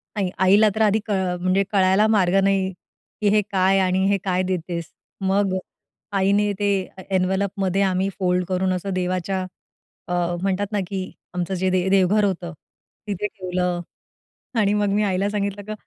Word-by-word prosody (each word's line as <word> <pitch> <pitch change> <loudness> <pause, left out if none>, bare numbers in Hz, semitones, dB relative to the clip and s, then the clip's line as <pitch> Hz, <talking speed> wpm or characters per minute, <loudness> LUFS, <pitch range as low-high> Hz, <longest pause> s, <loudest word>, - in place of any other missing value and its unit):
आणि 195 -3 0 0.2
आईला 205 +3 +6
तर 220 - -1
आधी 215 0 +4
क - - -3 0.3
म्हणजे 185 +2 +2
कळायला 195 +1 +4
मार्ग 195 -4 +3
नाही 195 -1 +2 0.5
की 210 - +2
हे 210 - +5
काय? 190 0 +3
आणि 190 0 +2
हे 200 - +3
काय 185 -1 0
देतेस? 170 -3 -3 0.3
मग 195 0 +1 0.6
आईने 200 +2 +2
ते 205 - +1 0.3
ए 190 - -9
एन्व्हलपमध्ये 190 +1 0
आम्ही 190 0 +1
फोल्ड 180 -1 +1
करून 185 0 0
असं 190 +2 -3
देवाच्या 185 +1 -1 0.7
अ, 175 0 0
म्हणतात 195 +1 0
ना 210 - 0
की 195 0 -3 0.3
आमचं 180 +1 -2
जे 185 0 0
दे 185 0 +1
देवघर 195 +2 +3
होतं 175 -3 -3 0.5
तिथे 205 0 -2
ठेवलं 180 -3 -2 0.8
आणि 205 -1 +2
मग 205 -1 +1
मी 210 +1 +2
आईला 195 -1 +1
सांगितलं, 205 -1 -2
"की 215 +2 -7
190 Hz, 165 wpm, -22 LUFS, 185-200 Hz, 0.8 s, आईला